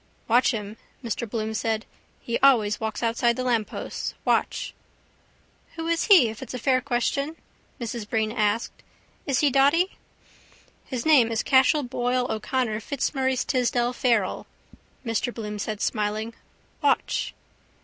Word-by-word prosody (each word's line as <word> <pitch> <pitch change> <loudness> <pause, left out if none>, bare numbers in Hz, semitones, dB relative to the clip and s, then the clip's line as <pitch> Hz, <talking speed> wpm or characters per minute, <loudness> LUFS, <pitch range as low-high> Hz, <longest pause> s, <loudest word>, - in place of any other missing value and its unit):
—Watch 240 +3 +4
him, 215 -2 -4 0.3
Mr 235 0 -3
Bloom 220 0 -3
said. 220 0 -1 0.4
He 235 - -2
always 225 -7 +4
walks 220 +1 -3
outside 235 +1 +2
the 255 - -3
lampposts. 235 -4 -2
Watch! - - 0 1.0
—Who 325 -1 -5
is 335 0 +1
he 360 - +7
if 220 +3 -8
it's 265 - -6
a - - -2
fair 255 +2 +2
question? 275 +3 -1 0.4
Mrs 230 -3 -5
Breen 220 -1 0
asked. 215 -1 -1 0.5
Is 275 -3 +1
he 290 -2 +3
dotty? 285 +8 +3 0.9
—His 250 -3 -4
name 270 -8 +5
is 225 - 0
Cashel 265 +2 +4
Boyle 250 0 0
O'Connor 220 0 -1
Fitzmaurice 265 +1 -1
Tisdall 245 -1 +1
Farrell, 235 -7 0 0.6
Mr 230 +2 -1
Bloom 210 -3 -6
said 210 0 -4
smiling. 215 +1 -1 0.5
Watch! - - 0
240 Hz, 135 wpm, -25 LUFS, 220-260 Hz, 1.0 s, he